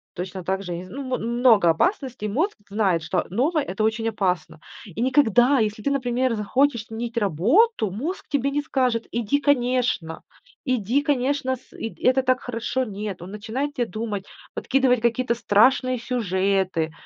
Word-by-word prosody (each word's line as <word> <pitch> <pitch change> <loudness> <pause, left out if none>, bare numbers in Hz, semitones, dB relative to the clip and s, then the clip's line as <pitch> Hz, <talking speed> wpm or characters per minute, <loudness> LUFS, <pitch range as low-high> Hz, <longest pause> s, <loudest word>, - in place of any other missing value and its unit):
Точно 185 +1 -5
также, 190 0 -3
я - - -4
не - - -7
зн 185 - -11
ну, 280 - -4
мо 255 -1 -2
много 235 -5 +3
опасностей. 255 - 0
Мозг 315 - -1
знает, 195 -6 +1
что 180 - -1
новое- 290 - +1
это 205 -2 -3
очень 225 +1 0
опасно. 180 -7 -2 0.3
И 195 -3 -10
никогда, 255 0 +4
если 215 0 -1
ты, 280 - 0
например, 255 -2 0
захочешь 235 +2 +1
сменить 230 +1 -5
работу, 220 - +2
мозг 295 - -4
тебе 280 -2 0
не 290 - 0
скажет: 250 -6 0
"Иди, 235 +4 0
конечно, 245 - 0 0.4
иди, 255 +2 +1
конечно, 270 -1 0
с 255 - -21
ы 225 - -6
это 260 +1 +3
так 255 0 +1
хорошо." 245 +2 -2
Нет, 205 -4 -6
он 180 +3 -9
начинает 240 +8 -4
те 245 - 0
думать, 210 -1 -4 0.3
подкидывать 260 -2 +2
какие-то 235 0 +1
страшные 255 +4 +3
сюжеты, 190 -7 0
235 Hz, 160 wpm, -23 LUFS, 200-260 Hz, 0.4 s, никогда